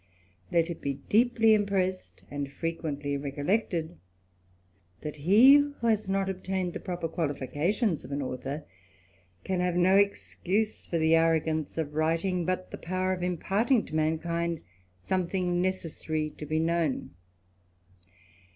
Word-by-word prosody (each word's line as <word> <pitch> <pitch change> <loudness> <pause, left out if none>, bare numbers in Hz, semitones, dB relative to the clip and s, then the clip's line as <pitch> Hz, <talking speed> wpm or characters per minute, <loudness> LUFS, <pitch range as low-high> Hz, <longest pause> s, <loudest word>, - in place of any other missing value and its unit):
Let 170 0 +2
it 170 - -7
be 140 -1 -2
deeply 225 0 +4
impressed, 195 -3 -1
and 140 -1 -4
frequently 145 -3 -3
recollectecJ* 160 - -1 1.0
that 150 0 -6
he 215 - +7
who 285 -4 -1
has 215 -3 +1
not 195 0 +1
obtained 185 -1 -2
the - - -4
proper 175 -3 -3
qualifications 160 - -1
of 125 - -10
a,t* 140 - -2
author, 135 +2 -4 0.8
can 185 -1 -1
have 180 -1 0
no 185 +2 +5
excuse 200 +1 0
for 170 - -1
the 160 0 +3
arrogance 160 -2 +2
of 155 -2 -2
writing, 165 +3 0
but 185 +1 -2
the - - -7
power 185 +2 -1
of 180 - -4
imparting 200 - +1
to - - -7
mankind 165 +1 0 0.4
something 180 - 0
necessary 160 -4 -2
to 150 - -9
be 155 +2 0
known. 165 -3 0
170 Hz, 135 wpm, -28 LUFS, 155-190 Hz, 1.0 s, he